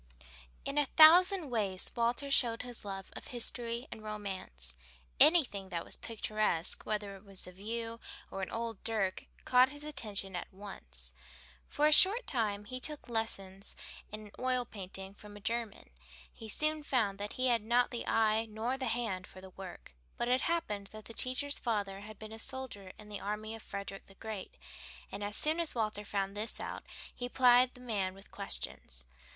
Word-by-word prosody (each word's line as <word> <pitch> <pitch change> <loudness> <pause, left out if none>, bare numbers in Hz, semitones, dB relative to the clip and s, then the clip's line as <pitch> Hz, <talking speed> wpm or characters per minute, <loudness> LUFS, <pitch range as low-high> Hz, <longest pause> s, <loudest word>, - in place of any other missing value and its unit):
In 285 +1 +1
a 290 - +3
thousand 340 +1 +8
ways 200 -5 0
Walter 240 +4 +1
showed 235 -4 +4
his 245 -1 -7
love 195 -2 -6
of - - -7
history 235 0 -1
and 220 - -7
romance. 190 - -5 0.4
Anything 245 - +5
that 170 -2 -3
was - - -1
picturesque, 215 -6 -1
whether 205 -2 -2
it 195 - -14
was 195 -2 -1
a 180 - -9
view 230 +4 -4 0.3
or 195 - -4
an 190 - -3
old 230 -2 -4
dirk, 215 -4 0 0.2
caught 255 +1 +6
his 290 +1 -7
attention 205 -10 -1
at 175 - -5
once. 60 - -8 0.6
For 295 - +2
a 305 - +6
short 400 +10 +8
time 210 -5 -1
he 255 +3 -5
took 295 -1 0
lessons 195 -4 -3 0.4
in 215 -1 -8
oil 255 -1 +1
painting 195 -2 -7
from 205 0 -12
a - - -10
German. 225 - -3 0.4
He 220 - -9
soon 305 +6 +2
found 220 -9 +1
that 205 +1 -4
he 255 0 +2
had 235 -2 +4
not 240 +3 +3
the 240 - -4
eye 220 0 +3
nor 230 +5 -2
the 260 - -1
hand 220 -6 -1
for 185 - -12
the 190 0 -11
work, 185 - -10 0.2
but 240 - 0
it 255 +1 +3
happened 210 -13 -1
that 215 +1 -11
the 230 - -8
teacher's 255 +5 -1
father 205 -5 -1
had 210 +1 -10
been 215 0 -9
a 220 - -8
soldier 225 -7 -5
in 210 - -12
the 205 -1 -5
army 210 +2 -3
of 225 - -8
Frederick 200 -1 -6
the 195 - -16
Great, 215 -2 -7 0.5
and 205 - -5
as 205 +1 -1
soon 315 +2 +3
as 335 -5 +2
Walter 215 -2 -1
found 195 -1 -2
this 215 +2 -1
out, - - -5 0.3
he 245 0 -4
plied 250 0 +6
the 250 - -13
man 200 -6 -1
with 195 +1 -15
questions. 65 - -3
220 Hz, 185 wpm, -33 LUFS, 200-245 Hz, 0.6 s, thousand